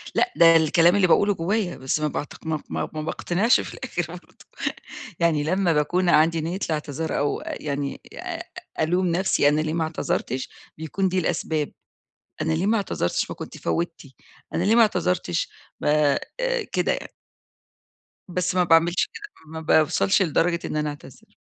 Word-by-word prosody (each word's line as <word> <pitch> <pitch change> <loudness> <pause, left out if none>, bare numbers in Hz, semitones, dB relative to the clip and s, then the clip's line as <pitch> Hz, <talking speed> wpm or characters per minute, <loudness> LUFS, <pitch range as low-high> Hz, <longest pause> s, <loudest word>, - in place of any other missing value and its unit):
لأ، 365 - +2
ده 165 -1 +7
الكلام 165 +3 +5
اللي 200 -2 +4
باقوله 205 +4 +4
جوّايا 190 +1 -1
بس 130 +3 -1
ما 155 - 0
باعتق 150 +2 -6
ما 155 -2 -2
ما - - -3
ما 155 - -3
باقتنعش 180 +8 +2
في - - -8
الآخر - - -3
برضه، - - -14 0.7
يعني 165 -3 +2
لما 180 +2 +1
باكون 175 +5 +1
عندي 160 +1 +4
نية 170 +4 -3
الإعتذار 155 0 -3
أو 145 - 0
يعني 140 -1 -4
آآ - - -5 0.4
ألوم 180 +4 +2
نفسي 175 -3 +2
أنا 150 +1 +2
ليه 155 0 -2
ما 165 -1 0
اعتذرتش 145 -4 -2 0.3
بيكون 160 +5 -1
دي 185 +1 +1
الأسباب. 160 -3 -1 0.7
أنا 160 +1 0
ليه 165 +4 0
ما 225 +2 +3
اعتذرتش 185 - -1
ما - - -5
كنتِ - - -8
فوتِّي، 165 -5 -3 0.4
أنا 170 - +1
ليه 210 +3 +4
ما 235 - +7
اعتذرتش 180 - 0 0.3
ب - - -4 0.9
كده - - +1
يعني. - - -5 1.2
بس 180 0 -1
ما 180 - +4
باعملش 170 +1 +4
كده، 435 -3 -8 0.3
ما 160 - -5
باوصلش 160 +5 +3
لدرجة 170 0 +2
إن - - -4
أنا 150 0 0
أعتذر. 145 -3 -12
165 Hz, 160 wpm, -24 LUFS, 155-180 Hz, 1.2 s, ده